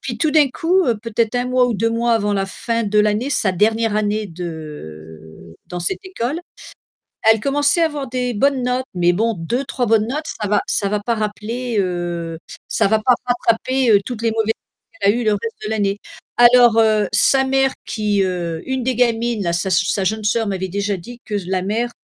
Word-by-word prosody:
puis 240 -3 -5
tout 305 +5 +2
d'un 300 -3 +5
coup, 355 +7 +1
heu, 235 -3 +1
peut-être 230 0 -1
1 245 - 0
mois 255 0 +3
ou 240 - -1
2 225 +3 0
mois 235 +1 +1
avant 205 -2 0
la 195 -1 0
fin 230 +4 -2
de 210 +1 +1
l'année, 210 +6 +1
sa 200 -7 +1
dernière 220 +3 +1
année 215 0 -1
de 80 - -9
dans 180 - -6
cette 170 - -2
école, 315 -4 -3 0.9
elle 220 - +4
commençait 285 +5 +2
à - - +5
avoir 290 -4 -5
des 250 0 -2
bonnes 270 +4 +1
notes, 250 +1 -1
mais 175 -1 +3
bon 225 +5 0
2-3 245 +8 -2
bonnes 220 -1 +3
notes, 300 +5 -3
ça 210 - -1
va 205 0 +2
ça 200 - 0
va 210 0 -1
pas 235 +3 -1
rappeler, 220 +3 -3
heu, 175 -3 -3 0.3
ça - - +2
va 220 +1 +2
pas 250 - +5
rattraper, 245 +1 +1
heu, 205 - +7
toutes 235 -1 -6
les 230 - +2
mauvaises 225 0 0
notes 335 - -31
qu'elle 200 - +4
a - - -1
eues 240 - -2
le 215 - +3
reste 225 +2 -3
de 215 - -3
l'année. 205 -2 0 0.5
Alors, 240 -2 +6
heu, 215 -3 +3
sa 270 -1 +4
mère 270 0 +2
qui, 210 -2 0
heu 175 -3 -3
une 260 -1 -1
des 255 0 -1
gamines, 235 -2 +1
là 170 - 0
sa 170 +2 -1
s 185 -1 +2
sa 195 - 0
jeune 215 +3 -1
sœur 225 +2 +1
m'avait 190 -1 -3
déjà 200 +2 -2
dit 240 +7 -11
que 210 - -3
s 200 - -4
la 185 0 -1
mère, 225 +5 -1
220 Hz, 220 wpm, -19 LUFS, 195-245 Hz, 0.9 s, heu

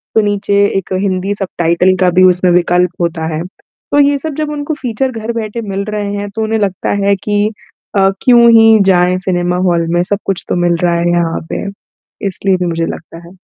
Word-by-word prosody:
तो 220 - +5
नीचे 200 0 +1
एक 190 0 -4
हिंदी 195 0 -1
सबटाइटल 180 -1 +1
का 180 - +4
भी 185 - +6
उसमें 180 0 +2
विकल्प 180 0 +2
होता 165 -1 -2
है। 155 - -3
तो 245 +8 -5
ये 285 - 0
सब 315 +1 -5
जब 300 -1 -2
उनको 295 +1 -3
फीचर 255 +1 -2
घर 225 -1 -5
बैठे 220 +1 -5
मिल 195 0 -2
रहे 210 -1 -3
हैं 205 0 -4
तो 220 - -1
उन्हें 220 0 -1
लगता 195 -3 -2
है 200 0 +3
कि 205 0 +1 0.5
अ, 195 0 +4
क्यों 240 -2 +6
ही 225 -1 +6
जाएँ 180 -1 +3
सिनेमा 180 -1 -1
हॉल 170 -1 +1
में, 175 - +2
सब 205 +2 -1
कुछ 195 -2 -2
तो - - 0
मिल 170 - +2
रहा 175 -1 +2
है 175 0 0
यहाँ 170 -1 0
पे। - - -3 0.6
इसलिए 195 0 0
भी 180 - -2
मुझे 165 0 -1
लगता 165 +1 -9
है। 175 - -14
195 Hz, 210 wpm, -14 LUFS, 175-215 Hz, 0.6 s, भी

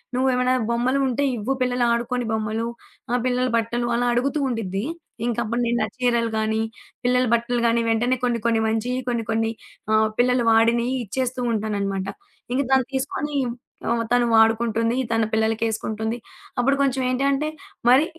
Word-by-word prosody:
"నువ్వేవైనా 255 0 +2 0.2
బొమ్మలు 250 +4 +1
ఉంటే 260 +2 0
ఇవ్వు 225 +6 -1
పిల్లలు 250 -1 +1
ఆడుకోని 240 +1 -1
బొమ్మలు, 220 +1 -1 0.4
ఆ! - - 0
పిల్లల 250 0 +1
బట్టలు" 240 +1 -1
అలా 245 +1 +1
అడుగుతూ 275 +5 0
ఉండిద్ది. 200 -4 -2 0.4
ఇంకప్పుడు 235 0 -1
నేను 235 0 +1
నా - - +1
చీరలు 235 -2 +1
గాని, 220 0 0 0.4
పిల్లల 250 0 +3
బట్టలు 235 +1 +1
గాని 230 0 +2
వెంటనే 240 +3 +2
కొన్ని 240 -1 0
కొన్ని 230 -1 +3
మంచియి 230 +3 -1
కొన్ని 235 -2 -1
కొన్ని 225 0 +1 0.4
ఆహ్, 215 0 +4
పిల్లలు 250 0 +3
వాడినయి 235 +2 +3
ఇచ్చేస్తూ 255 +4 -2
ఉంటాననమాట. 200 -3 -2 0.5
ఇంక 265 - +2
దాన్ని 265 -2 +4
తీసుకొని 285 +2 -2 0.5
ఆహ్, 235 0 +1
తను 245 0 +4
వాడుకుంటుంది 225 +1 +3 0.2
తన 225 0 +2
పిల్లలకేసుకుంటుంది. 220 0 -1 0.4
అప్పుడు 275 +3 +3
కొంచెం 265 -1 +1
ఏంటంటే, 275 +4 +1 0.4
మరి 265 +5 +6
235 Hz, 145 wpm, -23 LUFS, 225-250 Hz, 0.5 s, మరి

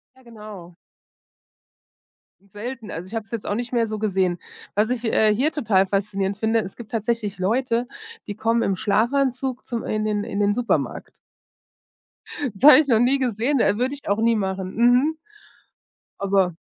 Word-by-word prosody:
Ja, 260 - -21
genau. 210 -7 -11 1.8
Selten. 230 +1 -6
Also, 170 +3 -6
ich 195 - -10
habe 225 -1 -3
es 200 - -22
jetzt 230 -3 -5
auch - - -1
nicht 240 +3 -4
mehr 235 -2 +2
so 215 0 -4
gesehen. 190 -4 0 0.4
Was 210 +3 +1
ich, 250 -1 -2
äh, 220 -1 +3
hier 280 +8 +1
total 205 -9 +2
faszinierend 195 0 -1
finde: 225 +1 +1
Es 190 -2 -7
gibt 230 -3 -11
tatsächlich 220 -2 -2
Leute, 235 +5 0 0.4
die 205 - -5
kommen 230 +2 +1
im 195 - 0
Schlafanzug 250 +5 0
zum 235 -2 -4
in 215 0 -2
den 210 -1 -1
in 200 - -4
den 205 0 +2
Supermarkt. 240 0 -2 1.4
Das 195 - -14
habe 300 - +10
ich 300 - -2
noch 230 -4 +4
nie 255 +3 +3
gesehen, 245 +2 0
äh, 205 - +2
würde 255 +3 0
ich 285 - -9
auch 200 +2 +1
nie 230 +1 +3
machen. 190 -2 -3
Mhm. 245 +7 +3 1.0
Aber 195 -3 +1
220 Hz, 175 wpm, -23 LUFS, 200-245 Hz, 1.8 s, habe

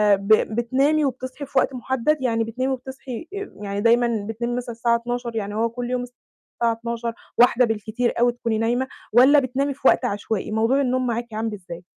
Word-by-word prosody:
ب 195 0 -8 0.3
بتنامي 275 +6 +2
وبتصحي 260 +2 -4
في 270 -1 +1
وقت 270 - 0
محدّد؟ 265 +4 0
يعني 230 -3 +1
بتنامي 255 +4 -2
وبتصحي 265 +2 -7
آآ، 400 0 -5
يعني 200 0 -3
دايمًا 235 -2 +2
بتنامي 235 +2 -2
مثلًا 245 -1 -4
الساعة 235 0 +2
00:00 240 0 -3
يعني 205 -1 -3
هو 230 +2 +1
كُلّ 240 +1 -5
يوم 250 -1 -1
الساعة 245 -1 -5
00:00، 235 0 -4 0.2
01:00 245 +1 +5
بالكتير 225 +2 -1
أوي 240 0 +4
تكوني 230 -2 -2
نايمة؟ 240 +4 0 0.3
والَّا 265 +5 +7
بتنامي 275 +2 -1
في 265 - 0
وقت - - +4
عشوائي؟ 210 -1 -2
موضوع 225 +6 +2
النوم 255 -1 0
معاكِ 235 -1 -3
عامل 220 0 -2
إزاي؟ 175 -3 -9
240 Hz, 185 wpm, -23 LUFS, 225-255 Hz, 0.3 s, والَّا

